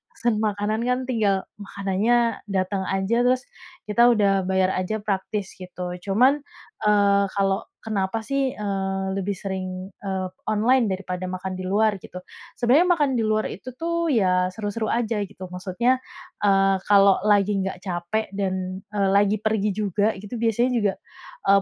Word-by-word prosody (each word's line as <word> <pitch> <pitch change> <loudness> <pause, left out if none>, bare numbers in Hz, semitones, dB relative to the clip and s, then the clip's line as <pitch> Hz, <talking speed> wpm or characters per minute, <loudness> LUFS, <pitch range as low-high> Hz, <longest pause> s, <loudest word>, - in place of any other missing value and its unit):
pesen 235 -3 0
makanan, 210 +1 -1
kan, 250 +1 +1
tinggal 210 -6 +1 0.2
makanannya 205 +4 0
datang 190 0 -1
aja, 195 +5 +1
terus 255 0 +2 0.4
kita 235 +3 +4
udah 200 -5 +3
bayar 190 0 +2
aja, 215 +4 -2
praktis 195 0 -2
gitu. 180 -1 -6
Cuman, 250 +10 +3 0.5
eee, 200 -1 +4
kalau 195 -1 +1 0.2
kenapa, 205 0 -1
sih, 275 +1 0
eee, 195 -2 -2
lebih 195 0 -2
sering, 185 -1 -5
eee, 190 -2 -2 0.2
online 225 +2 +3
daripada 185 -1 -4
makan 185 +1 -4
di 185 - -6
luar 200 +1 +1
gitu, 180 - -9 0.4
sebenarnya 270 +9 +4
makan 290 -2 +2
di 235 - +1
luar 215 0 +1
itu, 255 +6 -8
tuh, 335 0 -1
ya, 185 -7 +2
seru-seru 215 +3 -3
aja 230 -3 0
gitu. 195 -1 -7
Maksudnya, 235 +8 0 0.4
eee, 195 -1 +4
kalau 200 -2 +6
lagi 205 -1 +3
nggak 190 -1 -3
capek 175 +4 -2
dan, 190 -1 -3
eee, 200 -2 +1
lagi 205 +1 +3
pergi 215 -1 0
juga 205 +1 0
gitu 205 +5 -8
biasanya 235 +3 +2
juga, 210 -5 +1 0.5
eee, 195 0 +6
200 Hz, 150 wpm, -24 LUFS, 190-220 Hz, 0.5 s, kalau